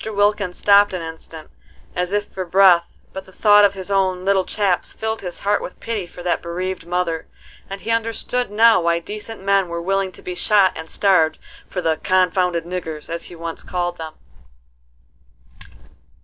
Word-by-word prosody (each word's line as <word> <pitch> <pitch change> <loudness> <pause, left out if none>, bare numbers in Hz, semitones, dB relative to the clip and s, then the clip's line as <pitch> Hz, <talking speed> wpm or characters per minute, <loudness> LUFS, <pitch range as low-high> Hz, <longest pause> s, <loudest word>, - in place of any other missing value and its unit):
Wilkins 205 -3 0
stopped 205 0 +5
an 180 -2 -3
instant 160 -1 -10 0.4
as 180 +1 -1
if 205 0 0
for 190 - -6
breath, 180 -1 +4
but 190 0 -7
the 190 - -16
thought 205 +1 +5
of 200 -1 +4
his 190 +1 -5
own 190 -2 +1
"little 195 -1 +2
chaps" 195 -4 0
filled 220 0 -3
his 180 -2 -5
heart 205 +1 +1
with - - -8
pity 215 -6 -4
for 175 - -11
that 175 - 0
bereaved 175 0 -4
mother; 175 -2 -2 0.4
and 195 0 -7
he 225 - -3
understood 230 +1 -1
now 220 -1 +5
why 170 0 +2
decent 210 +4 -7
men 195 -1 +2
were 170 0 -4
willing 195 +2 -1
to - - -14
be 180 - -5
shot 200 0 +3
and 160 0 -8
starved 180 -6 +2 0.3
for 180 - -4
"the 160 -2 +1
confounded 180 -2 +1
niggers," 165 -4 -6
as 170 0 -4
he 175 - -10
once 165 0 -6
called 175 -1 -3
them. 160 -1 -7
185 Hz, 175 wpm, -20 LUFS, 170-200 Hz, 0.4 s, stopped